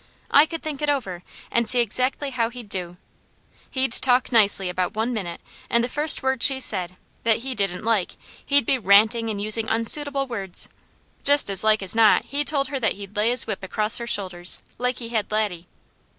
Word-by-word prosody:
I 290 +2 +5
could 330 0 -7
think 300 -3 -6
it 295 - -1
over, 200 -12 -3 0.3
and 235 -1 0
see 250 - +6
exactly 255 +5 0
how 235 -3 -1
he'd 240 -3 -11
do. 180 -2 -4 0.7
He'd 260 -2 -2
talk 250 +1 0
nicely 205 -5 +4
about 180 +3 -3
one 225 +3 -2
minute, 175 -7 -6 0.3
and 235 0 +1
the - - -1
first 295 +3 +2
word 265 -1 -1
she 270 -1 +4
said, 185 -7 0 0.3
that 225 -1 +1
he 265 - -4
didn't 195 -5 -3
like, 220 -5 -2 0.3
he'd 285 -3 +2
be 260 - 0
ranting, 220 +3 +3
and 210 -2 -5
using 215 +2 +2
unsuitable 275 +5 +2
words. 200 -8 -3 0.5
Just 285 -7 +5
as 195 - +4
like 215 -2 +2
as 185 - +3
not 225 -2 +3
he 285 +1 -2
told 280 -2 -1
her 275 -1 -4
that 225 -5 -1
he'd 200 0 -12
lay 210 +2 0
his 245 0 +2
whip 210 -3 -6
across 210 +4 -1
her 235 - -7
shoulders, 185 -5 +2 0.2
like 250 +1 -2
he 230 -2 -8
had 220 -3 -3
Laddie. 205 -5 -3
225 Hz, 200 wpm, -22 LUFS, 200-260 Hz, 0.7 s, see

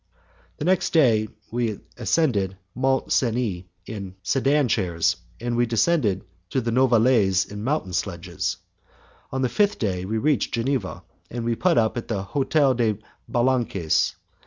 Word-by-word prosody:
The 150 - -4
next 185 0 +2
day 115 -9 +4 0.2
we 115 -3 -1 0.2
ascended 110 - +1 0.2
Mont 135 +1 0
Cenis 115 -7 0 0.2
in 100 -4 -7
sedan 135 +6 +2
chairs, 90 -7 +1 0.2
and 120 0 -2
we 120 0 +2
descended 115 - +1 0.2
to 130 - 0
the 115 -2 -2
Novalaise 115 -6 +4
in 105 0 -6
mountain 130 -8 -1
sledges. 85 -2 -2 0.7
On 130 0 -1
the - - +3
fifth 205 - +1
day 95 -5 -2
we 110 +3 -2
reached 140 +3 +1
Geneva, 120 -3 -2 0.3
and 120 -1 -4
we 120 - +1
put 175 +8 +2
up 110 +1 +2
at 120 - -4
the 100 -4 -2
Hotel 140 +5 +2
des 115 -3 +1 0.3
Balances. 120 -9 +1
120 Hz, 145 wpm, -24 LUFS, 100-130 Hz, 0.7 s, day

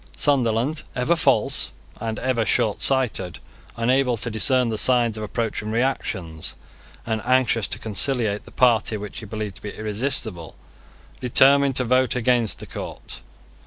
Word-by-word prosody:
Sunderland, 130 +1 +1
ever 125 +7 +2
false, 165 - +2 0.3
and 110 -1 -3
ever 130 -3 0
shortsighted, 110 -4 0 0.4
unable 125 +1 +2
to 115 +2 -1
discern 125 +3 +3
the 110 - -2
signs 120 -3 +2
of 110 - -6
approaching 110 0 -3
reaction, 105 -9 -2 0.6
and 110 -1 -2
anxious 125 -3 +2
to - - -3
conciliate 110 -1 0
the - - -13
party 115 -3 +2
which 105 -1 -7
he 110 - -9
believed 105 -2 -5
to - - -13
be 105 - -6
irresistible, 110 - -3 0.6
determined 135 +2 +4
to 130 - +1
vote 130 +2 +2
against 120 -2 +2
the - - -8
court. - - -7
115 Hz, 140 wpm, -23 LUFS, 110-130 Hz, 0.6 s, determined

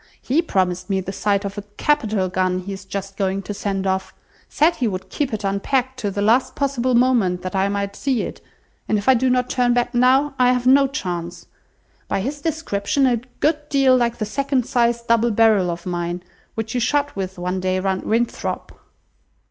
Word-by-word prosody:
He 285 +6 +1
promised 185 - -1
me 195 -1 +1
the 190 0 -5
sight 200 +1 0
of 200 +1 -4
a - - -8
capital 220 -10 +1
gun 185 0 0
he 190 +2 -5
is 190 0 -9
just 195 0 -6
going 195 0 -1
to 205 - -5
send 195 -1 -3
off; 190 0 -2 0.3
said 330 +3 +2
he 245 - 0
would 190 -2 -5
keep 285 -3 -1
it 215 -1 -4
unpacked 255 +6 -1
to 205 - -1
the 200 +1 -2
last 235 +5 +2
possible 255 -3 0
moment, 235 -8 +2
that 185 +1 -4
I 190 +1 +2
might 200 0 -2
see 265 -4 0
it; - - -7 0.5
and 215 - +3
if 205 - -5
I 265 - +8
do 255 +1 +2
not 250 0 +2
turn 245 -1 +1
back 245 0 0
now, 260 +4 +3
I 250 0 +5
have 250 -1 -1
no 275 +2 +6
chance. 175 - -5 0.6
By - - -1
his 285 +6 -4
description, 280 -4 0
a 245 -2 +3 0.2
good 300 -1 +1
deal 270 -2 +4
like 240 -1 +1
the 215 - -2
second 275 +2 -1
size 235 -1 +1
double 230 0 +2
barrel 215 -4 +3
of 170 0 -5
mine, 175 0 -3 0.3
which 225 0 -4
you 250 - 0
shot 285 +4 0
with 190 -1 -4
one 180 +1 -2
day 185 0 0
round 190 0 -1
Winthrop." 235 +1 -2
220 Hz, 205 wpm, -21 LUFS, 190-255 Hz, 0.6 s, I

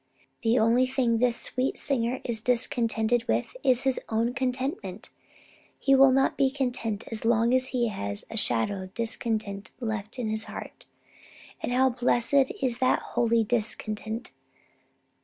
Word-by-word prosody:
The 230 +1 +2
only 235 +3 +3
thing 250 -3 +1
this 240 -1 +3
sweet 255 +1 0
singer 255 -2 0
is 230 -3 0
discontented 235 -1 +1
with - - -1
is 255 -1 +3
his 265 -1 +2
own 230 +2 0
contentment. 250 - -3 0.7
He 275 - +2
will 270 0 +7
not 270 +1 +2
be 270 - +3
content 245 -6 -2
as 225 - -1
long 230 +1 +3
as 255 0 +2
he 240 -3 0
has 100 - -5
a - - -6
shadow 195 - 0
of 185 0 -10
discontent 220 -4 -3
left 220 -1 -4
in 245 -3 -2
his 220 0 -2
heart. - - -9 0.8
And - - -3
how 260 +1 +3
blessed 250 +2 +2
is 245 -3 +2
such 255 0 +2
holy 230 -1 +1
discontent! 220 +1 -3
235 Hz, 150 wpm, -27 LUFS, 220-255 Hz, 0.8 s, will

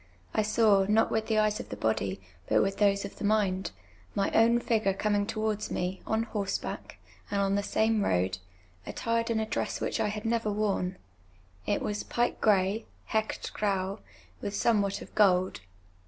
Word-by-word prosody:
I - - +2
saw, 215 -2 +4
not 220 +1 +3
with 220 0 0
tlie 220 -1 +2
eyes 215 0 +2
of - - -7
the - - -4
bodv, 100 -3 -1 0.3
but - - +4
with 195 0 -1
those 200 -1 +3
of 200 - -9
the - - -7
mind, 205 -3 +1 0.5
my 195 - +1
own 230 +1 +5
fij^ure 215 -5 +1
eomin«; 205 -1 +1
towards 215 -1 -2
me, 180 +1 -2
on 220 +1 +1
hoi 215 -3 -3
seback. - - -4 0.4
and 200 - 0
on 195 0 +2
the 200 - +2
same 220 +1 +1
road, 90 - +1 0.5
attired 230 0 -1
in 225 -1 +1
a 220 - 0
dress 215 - -2
which - - -2
I - - +2
had 210 +1 -4
never 225 -2 +1
worn; 200 -3 -1 0.3
— 95 0 -31
it - - 0
was 210 0 -2
j)ike 240 0 -1
«;rey 205 +1 +2 0.2
[/irc/tf 220 -1 -1
t/raii] 195 -1 -1 0.4
with 200 - -3
somewhat 205 -3 +1
of - - -15
};old. 185 -3 +3
205 Hz, 185 wpm, -29 LUFS, 195-220 Hz, 0.5 s, own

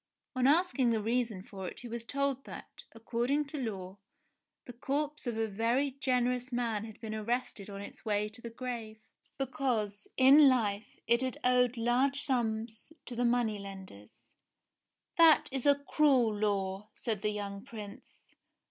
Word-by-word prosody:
On 255 0 +3
asking 295 -4 +3
the 225 -1 +2
reason 225 -3 -1
for 190 -2 -7
it - - -8
he 245 - -8
was 235 0 -5
told 275 +1 -1
that, - - -11
according 240 +6 -1
to 295 +1 -6
law, 195 -5 -5 0.7
the 245 - -9
corpse 285 +3 -3
of 235 -2 -2
a 225 - +1
very 230 +7 0
generous 250 -2 0
man 230 -3 -1
had 220 -2 -11
been 220 -2 -6
arrested 220 -2 -3
on 200 0 -7
its 200 - -10
way 210 -1 0
to 220 +3 -6
the 235 - -6
grave, 230 -2 -6 0.4
because, 240 -6 -2
in 275 +2 +8
life, 215 -5 0 0.2
it 235 +2 +3
had 260 -1 -2
owed 250 -1 +3
large 250 +4 +2
sums 230 -3 -1
to 245 - -7
the 245 +1 +1
money 235 -3 +1
lenders. 190 - -11 0.9
"That 330 -2 +6
Is 270 +1 -1
a 285 - +7
cruel 260 -8 +3
law," 200 -1 -1
said 220 -5 -3
the 210 - 0
young 200 -1 -5
Prince. 215 +2 -11
235 Hz, 160 wpm, -31 LUFS, 210-260 Hz, 0.9 s, in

